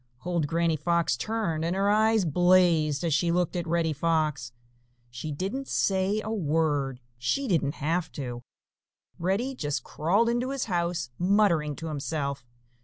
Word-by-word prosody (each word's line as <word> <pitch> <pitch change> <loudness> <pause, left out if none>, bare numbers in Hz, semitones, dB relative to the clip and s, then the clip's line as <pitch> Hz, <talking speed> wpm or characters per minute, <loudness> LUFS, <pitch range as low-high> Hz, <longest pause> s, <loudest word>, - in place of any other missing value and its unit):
Old 170 -4 0
Granny 165 +1 +1
Fox 170 -2 +1
turned, 190 - -2
and 170 +2 -1
her 195 +1 +1
eyes 215 0 +3
blazed 170 -2 +3
as 165 -3 +1
she 170 +3 +2
looked 180 +1 0
at 175 -1 -2
Reddy 165 -1 +1
Fox. 155 -5 0 0.6
She 125 +6 -5
didn't 195 - -3
say 195 +2 +1
a 215 - -4
word. 150 - 0 0.2
She 270 - 0
didn't 160 - +1
have 160 +3 -1
to. 120 -4 -5 0.8
Reddy 195 +10 0
just 145 - -3
crawled 195 +9 +1
into 240 +2 0
his 275 -1 -2
house, 170 - -1
muttering 175 -6 +2
to 165 - -7
himself. 140 -2 -3
170 Hz, 150 wpm, -27 LUFS, 150-195 Hz, 0.8 s, eyes